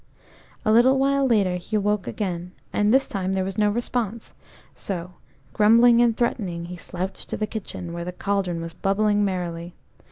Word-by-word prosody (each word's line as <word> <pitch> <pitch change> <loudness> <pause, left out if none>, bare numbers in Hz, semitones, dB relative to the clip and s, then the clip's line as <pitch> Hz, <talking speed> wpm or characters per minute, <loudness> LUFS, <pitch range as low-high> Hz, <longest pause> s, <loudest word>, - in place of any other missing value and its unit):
A 215 - +3
little 245 +4 +5
while 275 0 +2
later 200 -7 +2
he 215 +5 -2
woke 210 -1 0
again, 180 -3 -4 0.2
and 210 0 +2
this 270 +2 +4
time 190 -2 -2
there 190 -1 0
was 195 +2 -4
no 210 0 +4
response, 230 0 -3 0.4
so 180 -2 -5 0.4
grumbling 230 +2 +6
and 235 -2 +3
threatening, 190 -8 -1
he 180 +1 -7
slouched 180 +2 -5
to - - -3
the 215 - 0
kitchen, 195 -5 -6
where 170 0 -4
the 180 - -4
cauldron 185 -2 -2
was 165 0 -6
bubbling 205 +3 +1
merrily. 175 -3 -3
200 Hz, 170 wpm, -24 LUFS, 180-220 Hz, 0.4 s, grumbling